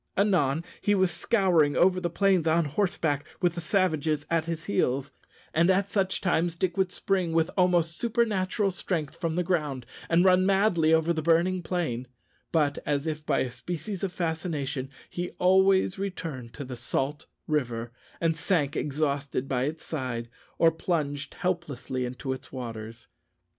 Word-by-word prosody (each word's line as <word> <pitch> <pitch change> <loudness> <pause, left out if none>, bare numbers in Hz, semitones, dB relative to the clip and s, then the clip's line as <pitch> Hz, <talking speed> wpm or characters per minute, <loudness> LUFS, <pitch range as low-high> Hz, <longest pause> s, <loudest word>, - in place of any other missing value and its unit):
Anon 170 -7 +2 0.2
he 205 - +3
was 190 -2 +3
scouring 175 -5 +2
over 185 0 +4
the 175 -1 -1
plains 185 -1 +2
on 165 +1 +3
horseback, 150 -3 0 0.2
with 175 -3 +2
the 170 - -5
savages 155 -4 +1
at 165 -1 +2
his 165 -1 -4
heels; 130 +5 0 0.4
and 170 +3 +4
at 195 +1 +2
such 190 -2 0
times 175 -2 +1
Dick 175 0 -1
would 190 -1 +1
spring 185 -3 0
with 165 +1 +2
almost 175 -3 +3
supernatural 210 -4 +1
strength 170 -5 -3
from 165 -2 -2
the 180 - +1
ground, 150 -8 -1 0.2
and 170 +2 +4
run 185 0 +5
madly 190 -4 +3
over 160 +1 +3
the 160 - -2
burning 170 +3 +2
plain; 160 -9 -2 0.4
but, 150 -3 +2
as 145 0 -1
if 155 -1 -3
by 140 - +2
a 125 - -2
species 180 - -5
of 195 - -1
fascination, 155 -6 -2 0.2
he 175 0 -4
always 190 +1 +4
returned 165 -11 -5
to 145 - -6
the 125 -1 -6
salt 135 +4 -2 0.2
river, 120 -6 -1 0.3
and 165 -1 +1
sank 160 -4 0
exhausted 140 -2 -1
by 130 -1 0
its 155 +3 -5
side, 125 -6 -4 0.3
or 165 -1 +5
plunged 150 -4 -2
helplessly 150 -8 -2
into 130 +2 -4
its 130 +1 -10
waters. 115 -2 -7
165 Hz, 160 wpm, -27 LUFS, 145-185 Hz, 0.4 s, run